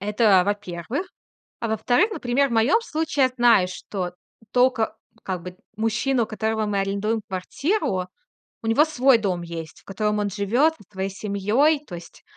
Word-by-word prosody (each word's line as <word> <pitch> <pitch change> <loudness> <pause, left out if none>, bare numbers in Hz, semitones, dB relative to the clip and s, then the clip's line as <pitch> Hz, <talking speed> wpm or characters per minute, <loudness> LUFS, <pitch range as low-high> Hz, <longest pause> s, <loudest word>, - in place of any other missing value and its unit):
Это, 210 -1 +4
а, - - 0
во-первых. 205 - -3 0.5
А 230 - -2
во-вторых, 245 - +2
например, 270 -4 +1
в - - -8
моем 235 - +4
случае 315 - 0
я - - +1
знаю, 230 -7 +5
что 185 0 -5 0.4
тока, 250 -2 +2 0.2
ну, - - -29
как 185 -3 -3
бы 180 0 -9 0.2
мужчина, 235 +4 +1
у - - -2
которого 220 0 -1
мы 205 -1 -1
арендуем 200 +3 -1
квартиру. 190 - -1 0.6
У - - -6
него 225 +7 +5
свой 270 -5 +4
дом 185 -5 -2
есть, 165 -2 -8
в - - -29
котором 210 +1 -1
он 205 -1 -1
живет 230 - +2
со 210 - -19
своей 190 0 -3
семьей. 215 +10 +1
То 180 - -9
есть 170 -1 -11
215 Hz, 175 wpm, -23 LUFS, 195-255 Hz, 0.6 s, знаю